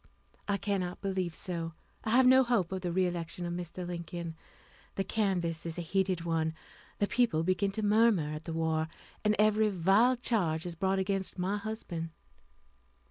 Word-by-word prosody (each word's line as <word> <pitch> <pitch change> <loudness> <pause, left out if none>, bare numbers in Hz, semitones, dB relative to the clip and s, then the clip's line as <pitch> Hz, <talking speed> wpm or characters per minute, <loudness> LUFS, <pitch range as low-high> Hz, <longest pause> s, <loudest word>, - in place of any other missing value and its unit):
"I 200 -1 +1
cannot 195 -3 -2
believe 185 -4 -2
so. 165 -2 -2 0.3
I - - -2
have 250 +3 +5
no 260 +1 +7
hope 235 -9 +1
of 190 -1 -3
the 175 -1 -2
re 185 +2 +2
election 175 0 -3
of 175 - -3
Mr. 175 +1 -5
Lincoln. 170 -1 -5 0.6
The 195 - 0
canvass 180 -7 0
is 165 0 -3
a 175 - -2
heated 185 +1 0
one, 160 -1 0 0.4
the 205 - +2
people 205 -8 +2
begin 185 +3 +1
to 215 - -2
murmur 205 -7 +3
at 155 +1 -7
the 165 - -4
war, 160 -1 0 0.4
and 210 0 +3
every 215 0 +4
vile 200 +7 +4
charge 180 -10 0
is 175 - -3
brought 190 +3 0
against 190 0 -1
my 190 +3 0
husband." 200 -6 -4
185 Hz, 175 wpm, -31 LUFS, 170-205 Hz, 0.6 s, no